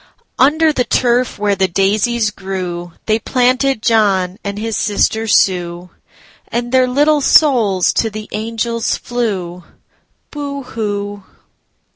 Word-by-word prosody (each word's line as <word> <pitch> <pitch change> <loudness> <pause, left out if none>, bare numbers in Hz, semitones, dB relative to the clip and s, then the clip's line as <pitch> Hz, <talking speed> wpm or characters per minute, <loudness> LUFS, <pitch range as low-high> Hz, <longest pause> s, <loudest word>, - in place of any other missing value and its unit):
Under 310 +3 +4
the 250 - +1
turf 245 0 +1
where 205 0 +1
the 190 0 +1
daisies 210 +5 +1
grewThey 190 +2 -4
planted 255 -1 +1
John 200 -4 +1
and 200 0 -4
his 225 +1 -3
sister 220 +2 0
Sue, 180 -3 +1 0.6
And 240 0 -3
their 255 -1 +4
little 295 +3 +2
souls 230 - +3
to 225 - 0
the 215 0 -8
angels 230 +2 -2
flew,—Boo 240 - -6
hoo! 205 -4 -4
220 Hz, 110 wpm, -16 LUFS, 195-250 Hz, 0.6 s, Under